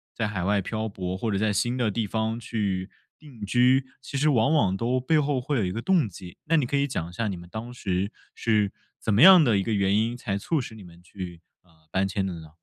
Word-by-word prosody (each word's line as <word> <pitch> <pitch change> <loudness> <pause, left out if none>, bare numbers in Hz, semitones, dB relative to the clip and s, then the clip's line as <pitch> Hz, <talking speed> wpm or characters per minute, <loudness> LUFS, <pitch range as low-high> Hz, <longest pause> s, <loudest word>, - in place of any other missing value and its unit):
在 110 -2 -1
海 95 -4 -3
外 100 +1 +2
漂 110 +2 -3
泊， 95 -2 -4
或 110 +2 -2
者 100 - 0
在 110 -1 +1
新 120 +5 0
的 120 -4 +1
地 110 +1 -1
方 110 +2 -2
去 100 -4 -3 0.3
定 135 -9 -13
居， 125 +5 +3 0.2
其 140 - -5
实 150 +1 +3
往 135 +3 +3
往 95 -10 +2
都 125 +3 0
背 155 +5 +2
后 140 -3 0
会 140 +1 -1
有 105 - +1
一 90 - -2
个 115 +4 -4
动 175 - +2
机， 90 -2 -11
那 165 +1 +3
你 140 - +2
可 140 - 0
以 140 - +2
讲 85 - -4
一 - - -12
下 110 +5 -2
你 95 - -2
们 85 0 -11
当 115 +3 -6
时 95 -3 -2 0.2
是 105 -3 +1 0.3
怎 110 - -1
么 105 +9 +5
样 185 -4 +10
的 110 -7 +3
一 95 - +1
个 115 - -1
原 100 0 +2
因， 115 +2 0
才 105 -5 -3
促 150 +8 -1
使 115 - -8
你 105 - -11
们 85 0 -15
去， 90 -2 -8 0.2
呃， 90 - -29 0.2
搬 95 +1 +1
迁 95 0 -2
的 90 -3 -4
呢？ 80 -1 -12
110 Hz, 280 characters per minute, -26 LUFS, 95-125 Hz, 0.3 s, 样